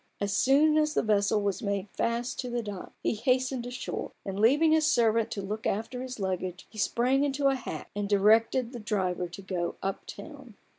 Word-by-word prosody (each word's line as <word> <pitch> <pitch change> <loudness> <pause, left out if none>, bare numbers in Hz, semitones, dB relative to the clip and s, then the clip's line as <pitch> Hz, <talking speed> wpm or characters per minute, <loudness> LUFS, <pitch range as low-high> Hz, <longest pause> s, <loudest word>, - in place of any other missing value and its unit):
As 200 -1 -1
soon 300 +3 +4
as 305 0 +1
the - - +2
vessel 210 0 +2
was 200 -2 -1
made 200 -1 -2
fast 235 +1 -2
to 250 - -3
the 240 -1 -2
dock, 205 -3 -7
he - - +1
hastened 255 +2 0
ashore; 245 0 -5
and 195 0 -4
leaving 290 +9 +5
his 315 0 +4
servant 230 -1 +3
to 200 - -4
look 215 +3 -3
after 225 +5 -2
his 255 -2 -6
luggage, 185 -1 -3
he 215 - -9
sprang 255 +6 +2
into 280 0 +2
a 270 - +1
hack, 255 - -7
and 205 -1 -2
directed 225 +4 +3
the 245 - -7
driver 190 -5 -1
to 175 +3 -10
go 180 -2 -3
"up 195 +1 -3
town." - - -10
225 Hz, 200 wpm, -28 LUFS, 200-255 Hz, -, leaving